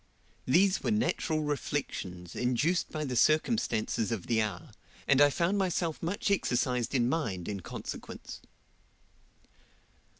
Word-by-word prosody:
These 185 +8 +4
were - - -1
natural 210 -7 0
reflections, 100 -12 -3
induced 130 +8 +1
by 155 -1 -3
the 130 -3 -3
circumstances 120 - +2
of 110 -6 -3
the 115 -2 +2
hour, 105 -1 -4 0.4
and 140 0 +5
I 145 - +8
found 175 +7 +1
myself 175 -4 -1
much 185 +4 -1
exercised 125 - 0
in 120 -2 +3
mind 110 - -2
in 100 -2 -3
consequence. 85 - -7
140 Hz, 125 wpm, -30 LUFS, 115-170 Hz, 0.4 s, I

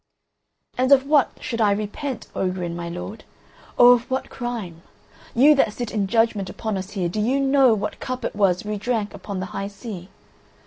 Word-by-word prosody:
"And 260 +2 +2
of 270 -1 +6
what 290 -1 +4
should 230 -2 -3
I 210 -2 +4
repent, 215 +6 -3
Ogrin, 180 -2 -2
my 170 0 -5
lord? 180 +5 -7 0.5
Or 245 0 +9
of 240 -1 -1
what 260 0 -2
crime? 225 -10 -5 0.5
You 280 +6 +7
that 270 -7 +2
sit 240 -1 -5
in 205 -3 -1
judgment 225 -3 +1
upon 220 +2 -4
us 190 +2 -5
here, 185 -4 -1
do 210 +5 -2
you 255 +6 +1
know 270 -3 +4
what 205 - -4
cup 255 0 -4
it - - -3
was 195 -2 +2
we 210 -1 -3
drank 215 -1 -2
upon 200 -1 -6
the 185 - -3
high 195 - -3
sea? 200 -2 -8
215 Hz, 190 wpm, -23 LUFS, 195-245 Hz, 0.5 s, Or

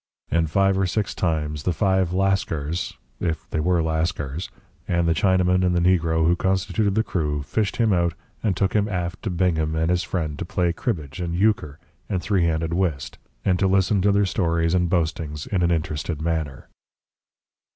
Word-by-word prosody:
And 80 -1 +2
five 95 +3 +2
or 95 - +2
six 105 +3 -1
times 75 -3 -1
the 90 - 0
five 95 0 +1
Lascars 90 -4 -1 0.2
if 80 -3 -2
they - - 0
were 85 +1 +2
Lascars 80 -1 -2 0.4
and 85 -1 +1
the 85 - +3
Chinaman 90 +1 +2
and 90 -1 +2
the - - +3 0.2
negro 80 -1 0
who 85 +2 +4
constituted 95 +3 0
the 110 - +3
crew, 75 -8 -2
fished 105 +7 -1
him 115 -4 +2
out 85 -2 +1 0.3
and 105 -5 0
took 95 -1 +1
him 105 0 +2
aft 90 -2 -3
to 110 - -3
Bingham 85 -3 0
and 80 +2 +1
his 90 -1 +2
friend 80 -6 -3
to - - -2
play 85 -1 0
cribbage 75 - -3
and 85 -1 -2
euchre 90 -7 +1 0.3
and 95 - 0
three 90 -2 +1
anded 80 +1 -1
whist, 85 -7 -2 0.3
and 90 -2 +2
to 95 - +3
listen 95 +1 +2
to 100 +2 +3
their 100 0 +3
stories 85 -3 0
and 90 -1 +2
boastings 80 -3 -1
in 95 -3 -1
an 85 - +3
interested 80 -1 -2
manner. 80 -4 -3
85 Hz, 185 wpm, -23 LUFS, 80-95 Hz, 0.4 s, who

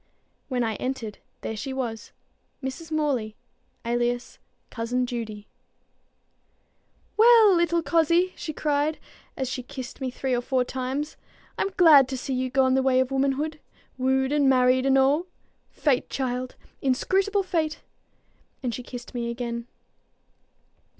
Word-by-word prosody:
When 250 -2 0
I 220 -2 -1
entered, 245 -5 -4 0.2
there 220 - -4
she 265 +5 -5
was, 235 -4 -4 0.5
Mrs. 295 +5 -5
Morley, 280 -9 -1 0.5
alias 240 +1 -1 0.3
Cousin 245 +2 -1
Judy. 225 -4 -5 1.7
"Well, 445 -2 +7
little 340 -1 +2
cozzie!" 340 +3 +3
she 310 - -5
cried, 300 0 0 0.4
as 265 - -1
she 255 0 -3
kissed 260 0 -8
me 260 - -1
three 260 +1 -2
or 245 - +1
four 255 0 +1
times, 265 +4 -4 0.4
"I'm 390 - 0
glad 300 -7 +8
to 265 0 -4
see 265 +1 -4
you 255 0 -1
gone 260 0 +3
the 265 - +3
way 260 -1 +3
of 260 0 +1
womankind, 275 +3 0 0.4
wooed 265 +1 +1
and 290 -2 +3
married 255 0 +4
and 270 0 +4
a'! 275 +4 +4 0.5
Fate, 275 -4 0
child! 255 -1 -3 0.3
inscrutable 390 +10 +1
fate!" 320 -4 -1 0.8
and 245 -2 -1
she 250 - -5
kissed 245 0 -9
me 235 -1 -2
again. 235 0 -4
265 Hz, 135 wpm, -25 LUFS, 245-295 Hz, 1.7 s, glad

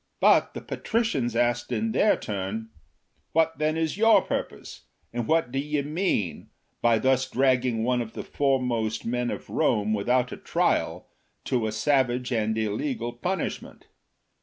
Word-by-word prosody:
But - - +4
the - - -5
patricians 150 - -1
asked 120 0 +1
in 225 0 0
their 215 0 +3
turn: 105 +2 -4 0.3
" - - -45
What 160 0 +2
then 155 +1 +1
is 160 +2 -1
your 225 0 +6
purpose, - - -5 0.3
and 120 -1 -2
what 160 -6 +2
do 135 - -1
ye 150 +1 -1
mean, 150 - -1 0.3
by 120 -1 +4
thus 130 +2 +1
dragging 125 -3 +2
one 125 0 +1
of 115 -1 -6
the - - -5
foremost 125 -6 0
men 120 +1 -1
of - - -5
Rome, 110 -8 +1
without 125 +5 +1
a - - -6
trial, - - 0 0.4
to 120 -4 0
a - - -2
savage 125 +1 +1
and 110 -2 0
illegal 115 +2 -2
punishment 180 +10 -4
125 Hz, 155 wpm, -26 LUFS, 115-150 Hz, 0.4 s, your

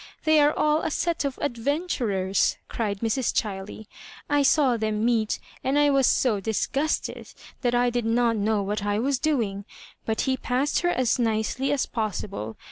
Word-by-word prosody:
They 315 -1 +4
are 295 0 +5
all 305 +1 +1
a - - -1
set 335 0 -1
of 275 -2 -3
adventurers 240 - 0
I" - - -19
cried 205 -4 -2
Mrs. 230 +2 0
Chiley. 205 0 -6 0.2
" - - -18
I - - +4
saw 275 -2 +4
them 215 -1 -1
meet, 225 -3 +1 0.3
and 270 +2 +1
I 290 0 +4
was 275 -2 +3
so 225 -6 +2
disgusted 270 +9 -2 0.3
that 245 -2 +1
I 245 0 +2
did 240 -1 -1
not 230 0 +2
know 210 0 0
what 205 +1 -2
I 205 0 0
was 265 +3 0
doing; 230 -11 -1 0.4
but 220 -1 -1
he 260 -1 0
passed 260 +3 0
her 350 - +1
as 255 -6 +1
nicely 230 +4 0
as 285 -2 +1
possible. 200 - -4
240 Hz, 180 wpm, -25 LUFS, 215-280 Hz, 0.4 s, are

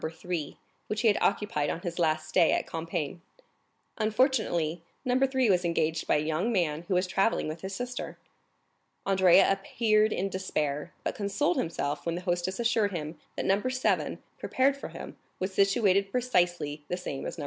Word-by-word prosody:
3, 160 -2 -5 0.3
which 215 +1 -2
he 230 - +3
had 210 - +4
occupied 195 -8 +1
on 170 - -3
his 175 0 -5
last 155 -2 +1
stay 165 +1 +4
at - - 0
Compiègne. 165 -1 -4 0.8
Unfortunately, 215 - +1 0.2
No. 250 0 +2
3 260 -2 +1
was 180 -2 +3
engaged 160 -2 0
by - - +3
a 150 - +1
young 160 +9 0
man 170 -5 0
who 190 - +1
was 180 +1 +2
travelling 195 +2 +1
with 155 +1 -5
his 190 0 -5
sister. 245 +3 -5 0.9
Andrea 190 -1 +5
appeared 215 +2 +2
in 195 +2 -1
despair, 150 -6 -2
but - - -1
consoled 200 -3 0
himself 150 -3 -2
when 170 - 0
the 175 - -4
hostess 180 +2 -1
assured 225 -3 +2
him 155 -2 -5 0.2
that - - -3
No. 195 +2 +3
7, 255 +1 0 0.2
prepared 270 +2 +2
for 280 - -7
him, - - -9 0.2
was 185 +1 -2
situated 195 -1 +3
precisely 175 -11 0
the 180 - -2
same 145 -7 -5
as - - -6
No. - - -8
185 Hz, 175 wpm, -29 LUFS, 165-215 Hz, 0.9 s, Andrea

